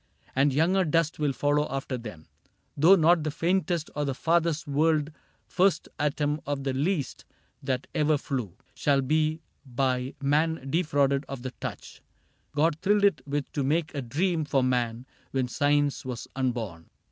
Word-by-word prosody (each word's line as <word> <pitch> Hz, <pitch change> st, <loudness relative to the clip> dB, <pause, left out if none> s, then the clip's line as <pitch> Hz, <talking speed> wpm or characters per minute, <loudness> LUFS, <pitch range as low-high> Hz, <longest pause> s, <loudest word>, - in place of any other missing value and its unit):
And 140 Hz, +2 st, +3 dB
younger 170 Hz, +7 st, +3 dB
dust 165 Hz, -1 st, +1 dB
will 150 Hz, -2 st, +1 dB
follow 145 Hz, +3 st, +1 dB
after 135 Hz, -1 st, -3 dB
them; 105 Hz, -10 st, -8 dB, 0.5 s
Though 165 Hz, +7 st, +7 dB
not 170 Hz, -1 st, +4 dB
the 155 Hz, -, -1 dB
faintest 170 Hz, +1 st, 0 dB
or 150 Hz, -, -1 dB
the 135 Hz, -2 st, -2 dB
farthest 165 Hz, 0 st, +1 dB
whirled 150 Hz, +1 st, +1 dB, 0.3 s
First 185 Hz, -3 st, +1 dB
atom 150 Hz, 0 st, 0 dB
of 145 Hz, -1 st, -2 dB
the 135 Hz, -1 st, -1 dB
least 145 Hz, +1 st, -1 dB, 0.4 s
that 130 Hz, -2 st, -2 dB
ever 150 Hz, 0 st, +2 dB
flew 125 Hz, -, -4 dB, 0.2 s
Shall 140 Hz, -2 st, +2 dB
be 155 Hz, +3 st, +1 dB, 0.2 s
by 130 Hz, 0 st, -1 dB
man 150 Hz, 0 st, 0 dB
defrauded 140 Hz, -4 st, +2 dB
of 135 Hz, -3 st, -6 dB
the 130 Hz, -, -4 dB
touch -, -, -7 dB, 0.5 s
God 155 Hz, +1 st, +2 dB
thrilled 205 Hz, +1 st, +3 dB
it 195 Hz, -10 st, +3 dB
with 145 Hz, 0 st, -3 dB
to 140 Hz, -, -1 dB
make 155 Hz, +4 st, 0 dB
a 145 Hz, -, -3 dB
dream 160 Hz, +7 st, 0 dB
for 140 Hz, -3 st, +1 dB
man 120 Hz, -1 st, 0 dB, 0.2 s
When 130 Hz, -2 st, -1 dB
Science 145 Hz, +2 st, +1 dB
was 125 Hz, -2 st, -6 dB
unborn. 115 Hz, -11 st, -3 dB
145 Hz, 160 wpm, -27 LUFS, 135-160 Hz, 0.5 s, Though